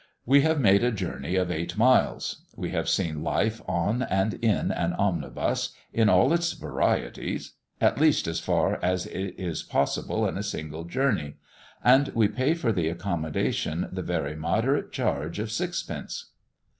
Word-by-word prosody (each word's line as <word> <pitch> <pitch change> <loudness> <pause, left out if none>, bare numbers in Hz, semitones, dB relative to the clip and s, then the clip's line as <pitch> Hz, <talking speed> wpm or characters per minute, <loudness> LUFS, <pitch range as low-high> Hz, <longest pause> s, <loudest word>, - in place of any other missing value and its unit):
We 140 +3 +6
have 160 +1 +2
made 100 -4 +5
a 120 - +3
journey 95 -3 -3
of 90 -1 +1
eight 85 +2 -3
miles. 125 +3 +2
We - - -4
have - - -1
seen 80 -2 0
life 105 +9 0
on 105 +8 0
and 95 -2 +1
in 110 +1 +1
an - - -1
omnibus, - - -1 0.2
in 115 -2 +4
all 95 - +5
its 170 0 +1
varieties; - - -2 0.3
at - - +3
least, 155 -2 +4
as 80 0 -2
far - - +1
as 90 0 +1
it 95 -1 -5
is 90 -4 -3
possible - - 0
in - - -3
a - - -2
single 80 +1 -5
journey; 90 - 0 0.5
and 130 +3 +6
we 110 -2 +4
pay 130 +9 +1
for 135 -9 0
the 90 -6 0
accommodation 85 -3 -2
the - - -4
very 70 +2 -2
moderate 110 - 0
charge 80 +5 -2
of 110 +1 -3
sixpence. 175 +7 -4
100 Hz, 160 wpm, -26 LUFS, 85-125 Hz, 0.5 s, We